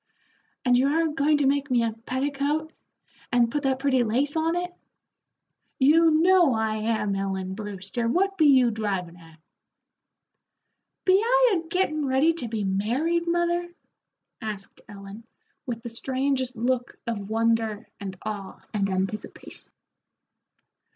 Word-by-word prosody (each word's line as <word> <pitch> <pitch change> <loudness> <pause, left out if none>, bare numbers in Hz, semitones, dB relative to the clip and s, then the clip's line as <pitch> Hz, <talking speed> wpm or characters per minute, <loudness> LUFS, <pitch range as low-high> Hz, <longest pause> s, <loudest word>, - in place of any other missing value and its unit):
"And 245 -1 +4
you 265 - +3
are 320 +3 +2
going 300 0 +2
to 290 - +1
make 280 +1 +1
me 245 -2 +2
a 230 - 0
petticoat 280 +6 -2 0.6
and 240 -2 +3
put 295 - -1
that 265 -2 +1
pretty 265 -2 +2
lace 260 +7 0
on 325 +1 +1
it?" 355 0 -3 1.0
"You 320 +5 +5
know 330 -3 +4
I 220 -1 0
am, 215 -2 -1
Ellen 190 -1 -3
Brewster, 205 +2 -4
what 390 +10 +1
be 315 -5 +4
you 260 -4 +5
drivin' 195 -6 -3
at?" 165 -2 -17 1.7
"Be 370 - +5
I - - +4
a - - -16
gettin' 310 -4 0
ready 270 +5 +3
to 275 -8 -5
be 220 -2 -3
married, 250 - 0
mother?" 345 0 0 0.7
asked 210 -3 -7
Ellen, 200 +2 -10 0.4
with 230 -2 -4
the 240 - -5
strangest 260 +1 -2
look 245 +1 -1
of 210 -4 -4
wonder 225 -1 0
and 190 -2 -6
awe 205 -3 -6
and 200 -2 0
anticipation. 190 +3 -5
250 Hz, 135 wpm, -25 LUFS, 215-310 Hz, 1.7 s, You